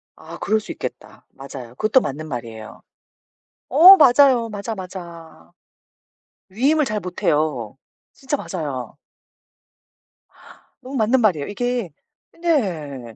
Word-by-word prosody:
아 - - -11
그럴 220 +1 +1
수 - - -9
있겠다. - - -8
맞아요. 130 -3 -10
그것도 215 - +3
맞는 155 +3 -5
말이에요. 115 -5 -8 0.9
어 360 +8 +9
맞아요. 250 -4 +5
맞아, 210 +2 -5
맞아. 170 - -10 1.0
위임을 280 +10 +1
잘 215 -4 -3
못해요. 150 - -2 0.4
진짜 270 +2 -3
맞아요. 145 - -6 1.9
너무 265 +2 -8
맞는 235 +2 +2
말이에요. 170 -10 +1
이게 245 -1 -3 0.5
네. 155 - -2
190 Hz, 230 characters per minute, -21 LUFS, -, 1.9 s, 어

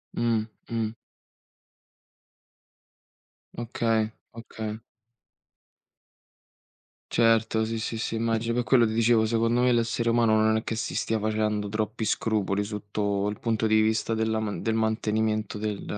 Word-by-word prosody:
Mh, 115 -2 +1 0.2
mh. 115 -2 -2 2.6
Okay, 115 -2 0 0.2
okay. 110 -2 -6 2.3
Certo, 115 -1 +3
sì, 115 0 -3
sì, 110 +1 -3
sì, 110 - -3
immagino. 115 0 0
Per 125 +1 0
quello 120 0 +4
ti 110 - -1
dicevo, 115 0 +3
secondo 115 +2 +1
me 125 0 +4
l'essere 115 0 +1
umano 115 -2 +3
non 110 0 +3
è 110 - -3
che 115 - -3
si 110 - -3
stia 115 - 0
facendo 105 -1 -1
troppi 110 +1 -2
scrupoli 105 -2 0
sotto 100 -1 -2
il 105 - -6
punto 115 -1 0
di 110 0 +4
vista 110 +1 +1
della 110 0 0
man 105 -2 -3
del 110 -1 0
mantenimento 110 -1 0
del 105 -1 -3
110 Hz, 130 wpm, -26 LUFS, 110-115 Hz, 2.6 s, quello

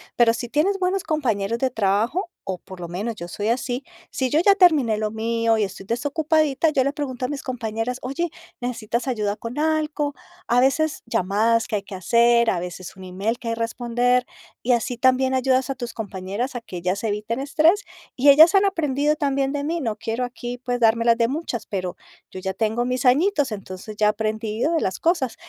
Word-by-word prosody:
pero 235 -1 +5
si 240 +1 -4
tienes 320 +10 +1
buenos 370 +1 0
compañeros 230 -8 -1
de 265 - +1
trabajo, 225 - 0 0.2
o 185 -2 -2
por 185 -1 -12
lo 170 - -5
menos 205 +6 -4
yo 175 - -7
soy 205 +4 -3
así. 250 +2 -1 0.3
Si 260 -1 -1
yo 300 +5 +3
ya 395 +3 +5
terminé 300 - +4
lo 215 0 -2
mío 230 +1 +1
y 215 - +2
estoy 195 -1 -6
desocupadita, 300 - +1
yo 275 - +2
le 280 - 0
pregunto 260 -4 -3
a - - -1
mis 290 0 -5
compañeras: 245 0 -3
"Oye, 275 +7 -2 0.3
¿necesitas 235 -1 -2
ayuda 210 -4 -1
con 235 +6 -6
algo?" 305 -2 0 0.3
A 245 +1 +4
veces 310 +4 +1
llamadas 225 +2 +1
que 225 - -2
hay 200 - -2
que 195 - -8
hacer, 235 +5 +4
a 180 - 0
veces 180 +1 -7
un 190 - -11
email 195 +6 -2
que 235 - -5
hay - - 0
responder, 240 +2 0 0.4
y 250 - +1
así 240 +1 +1
también 260 +1 +3
ayudas 260 +1 +2
a 270 - -2
tus 240 -2 -6
compañeras 205 +4 -4
a 245 - -3
que 185 -5 -8
ellas 185 +4 -2
eviten 220 +3 -2
estrés. 320 +8 +3 0.3
Y 275 +3 +4
ellas 315 +7 +8
han 390 - +6
aprendido 300 -6 +1
también 275 -2 0
de 285 0 -2
mí, 335 +2 -1
no 220 -5 -2
quiero 225 +3 -3
aquí, 245 0 -5
pues, 245 0 -3
dármelas 230 0 +4
de 230 -1 +3
muchas, 270 -4 -4
pero 185 -3 -4 0.4
yo 185 - -7
ya 190 +1 -3
tengo 220 +4 0
mis 250 0 -1
añitos, 290 - +3
entonces 195 0 -7
ya 215 - +2
he - - +5
aprendido 220 +5 -1
de 325 - +2
las 190 - -2
cosas. 325 -9 +1
240 Hz, 205 wpm, -23 LUFS, 215-280 Hz, 0.4 s, ellas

